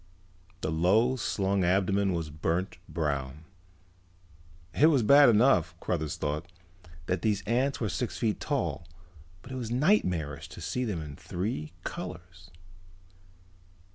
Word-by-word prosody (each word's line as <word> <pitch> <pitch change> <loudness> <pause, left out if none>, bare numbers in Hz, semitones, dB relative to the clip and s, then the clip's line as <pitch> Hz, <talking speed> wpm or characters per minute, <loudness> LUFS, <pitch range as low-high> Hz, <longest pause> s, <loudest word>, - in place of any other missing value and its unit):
The 80 - -1
low 100 +10 +3
slung 100 -3 0
abdomen 95 +2 +2
was 85 -3 -2
a - - -11
burnt 85 +5 -2
brown. 75 -2 -3 1.3
It 150 - +5
was 140 -7 +3
bad 140 +4 +7
enough, 105 -8 +3
Cruthers 80 -4 -2
thought, 75 +4 -3 0.5
that 90 +1 -1
these 105 -3 0
ants 125 +6 +1
were 110 - -1
six 120 +5 -3
feet 110 -3 0
tall, 85 - -2 0.6
but 130 - -11
it 130 - -4
was 120 -3 -4
nightmarish 105 - +1
to - - -11
see 125 0 -2
them 90 -8 -3
in 75 -2 -8
three 85 -5 -4
colors. 85 +1 -8
95 Hz, 135 wpm, -29 LUFS, 80-120 Hz, 1.3 s, bad